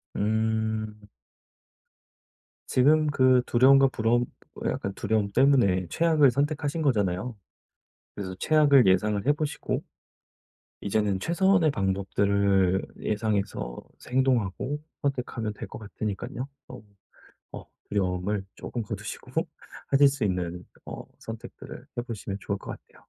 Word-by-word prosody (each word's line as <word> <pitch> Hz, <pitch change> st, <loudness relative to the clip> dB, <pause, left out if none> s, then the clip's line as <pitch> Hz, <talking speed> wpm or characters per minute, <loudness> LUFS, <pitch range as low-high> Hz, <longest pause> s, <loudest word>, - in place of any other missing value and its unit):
음. 110 Hz, 0 st, -1 dB, 1.7 s
지금 150 Hz, +4 st, +4 dB
그 130 Hz, -3 st, +4 dB
두려움과 135 Hz, +3 st, +6 dB
부러움 120 Hz, +1 st, +1 dB, 0.4 s
약간 100 Hz, -, -2 dB
두려움 105 Hz, -2 st, 0 dB
때문에 115 Hz, -9 st, +3 dB
최악을 155 Hz, -5 st, +4 dB
선택하신 145 Hz, +3 st, -1 dB
거잖아요. 105 Hz, -, 0 dB, 0.8 s
그래서 95 Hz, -2 st, -5 dB
최악을 145 Hz, -6 st, +5 dB
예상을 100 Hz, +3 st, +2 dB
해 145 Hz, -, +5 dB
보시고 150 Hz, 0 st, -3 dB, 1.0 s
이제는 100 Hz, -2 st, 0 dB
최선의 175 Hz, -, +3 dB
방법들을 100 Hz, -2 st, +1 dB, 0.2 s
예상해서 105 Hz, -, -2 dB, 0.3 s
행동하고 130 Hz, +1 st, +1 dB, 0.2 s
선택하면 125 Hz, -5 st, -2 dB
될 -, -, -8 dB
것 -, -, -9 dB
같으니깐요. 110 Hz, +4 st, -5 dB, 0.2 s
어 -, -, -10 dB, 0.7 s
어 -, -, -8 dB, 0.2 s
두려움을 95 Hz, 0 st, -1 dB
쪼금 120 Hz, -, -5 dB
거두시고 -, -, -7 dB, 0.6 s
하실 140 Hz, +1 st, +6 dB
수 135 Hz, -5 st, -2 dB
있는 90 Hz, -2 st, -2 dB, 0.2 s
어 -, -, -7 dB, 0.2 s
선택들을 115 Hz, 0 st, -9 dB
해 -, -, +1 dB
보시면 110 Hz, -4 st, -6 dB
좋을 100 Hz, -, -2 dB
것 -, -, -8 dB
같아요. -, -, -12 dB
110 Hz, 270 characters per minute, -27 LUFS, 100-135 Hz, 1.7 s, 두려움과